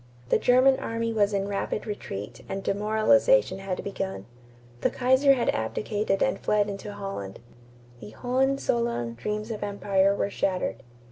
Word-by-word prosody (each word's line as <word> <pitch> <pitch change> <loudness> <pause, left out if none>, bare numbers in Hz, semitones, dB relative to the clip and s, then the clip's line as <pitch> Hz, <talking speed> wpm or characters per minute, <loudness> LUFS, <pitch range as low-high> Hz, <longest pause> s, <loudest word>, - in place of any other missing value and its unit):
The - - +3
German 255 +2 +4
army 230 0 -2
was 210 -2 +2
in 200 -1 -1
rapid 200 +1 -2
retreat 105 - -6
and 195 0 -4
demoralization 220 - +3
had 195 -1 -4
begun. 190 - -4 0.6
The - - +3
Kaiser 260 +2 +4
had 240 - 0
abdicated 195 - -1
and 265 - 0
fled 210 -1 +1
into 200 +1 -7
Holland. 195 - -6 0.6
The 105 - -9
Hohenzollern 240 - 0
dreams 210 - -4
of 215 - -5
empire 200 -1 +1
were 200 - -1
shattered. 185 -8 -1
205 Hz, 140 wpm, -26 LUFS, 195-235 Hz, 0.6 s, German